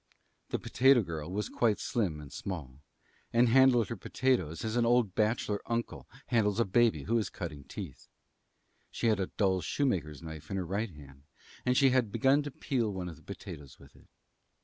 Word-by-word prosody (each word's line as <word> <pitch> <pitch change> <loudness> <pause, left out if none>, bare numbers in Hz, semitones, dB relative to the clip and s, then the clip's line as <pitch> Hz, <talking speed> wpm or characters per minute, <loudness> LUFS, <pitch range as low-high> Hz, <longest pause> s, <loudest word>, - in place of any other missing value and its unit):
The - - -1
potato 130 -2 +4
girl 80 -2 -5
was 105 +2 -2
quite 110 -4 +1
slim 95 -11 -1
and 75 -2 -11
small, 75 -8 -6 0.5
and 120 +1 +4
handled 125 -3 +5
her 115 - -3
potatoes 105 - -1
as 110 +1 -2
an 120 - +3
old 115 -4 +3
bachelor 105 -1 0
uncle 115 0 -3 0.2
handles 110 -3 +1
a 115 - +3
baby 110 -6 +3
who 115 +7 +1
is 105 - -2
cutting 75 -6 -7
teeth. - - -8 0.8
She - - -4
had 110 -2 +2
a 95 - 0
dull 95 -3 +1
shoemaker's 85 - -1
knife 80 -2 -9
in 95 - -2
her 95 - -2
right 100 +6 -2
hand, 70 -4 -15 0.4
and 125 0 +3
she 135 -2 +5
had 125 -5 +2
begun 135 +5 +3
to 145 - -5
peel 125 -5 -1
one 95 -2 -4
of 85 - -9
the - - -19
potatoes 70 -2 -9
with - - -18
it. - - -20
105 Hz, 190 wpm, -31 LUFS, 85-120 Hz, 0.8 s, handled